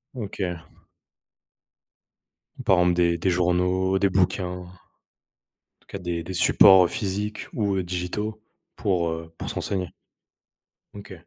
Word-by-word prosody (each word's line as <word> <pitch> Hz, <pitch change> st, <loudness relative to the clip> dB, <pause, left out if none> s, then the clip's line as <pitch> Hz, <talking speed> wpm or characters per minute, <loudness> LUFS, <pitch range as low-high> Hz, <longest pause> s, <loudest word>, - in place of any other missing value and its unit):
OK. 105 Hz, -4 st, -5 dB, 2.2 s
Par 95 Hz, -, +4 dB
exemple, 90 Hz, 0 st, +3 dB
des 85 Hz, -1 st, +2 dB
des 95 Hz, +3 st, 0 dB
journaux, 90 Hz, +2 st, +1 dB
des 100 Hz, -, +3 dB
bouquins. 95 Hz, 0 st, +1 dB
En 90 Hz, 0 st, -7 dB, 1.1 s
tout -, -, -33 dB
cas, -, -, -6 dB
des 85 Hz, -1 st, -4 dB
des 95 Hz, +2 st, -7 dB
supports, 95 Hz, 0 st, +6 dB
heu, -, -, +1 dB
physiques 105 Hz, +2 st, -4 dB
ou, 100 Hz, -3 st, 0 dB
heu, 95 Hz, -, -1 dB
digitaux 95 Hz, +5 st, -4 dB, 0.3 s
pour, 90 Hz, -5 st, 0 dB
heu, 80 Hz, 0 st, -6 dB
pour -, -, -5 dB
se -, -, -5 dB
renseigner. 95 Hz, -3 st, -3 dB, 1.1 s
OK. 100 Hz, -1 st, -10 dB
90 Hz, 135 wpm, -24 LUFS, 90-100 Hz, 2.2 s, supports